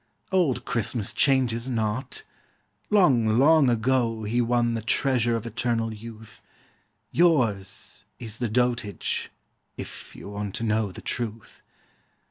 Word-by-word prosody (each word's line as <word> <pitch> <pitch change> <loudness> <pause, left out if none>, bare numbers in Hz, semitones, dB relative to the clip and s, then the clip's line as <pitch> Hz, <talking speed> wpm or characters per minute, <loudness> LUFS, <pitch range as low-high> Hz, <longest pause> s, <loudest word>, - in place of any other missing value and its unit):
Old 175 -9 +1
Christmas 115 -2 -1
changes 130 -4 +2
not! 115 +2 -2 0.7
Long, 125 - +4
long 145 0 +5
ago 115 -1 +1
He 115 +4 +1
won 120 0 +1
the 115 - -2
treasure 120 0 +1
of 115 0 -4
eternal 115 -1 -1
youth; 110 0 -11 0.7
Yours 120 - +1
is 115 -1 -5
the 120 -3 -1
dotage 120 -4 -1 0.5
if - - -8
you - - -10
want 100 -1 -5
to - - -3
know 110 -2 +1
The - - -10
truth. 110 -4 -5
115 Hz, 120 wpm, -26 LUFS, 110-125 Hz, 0.7 s, long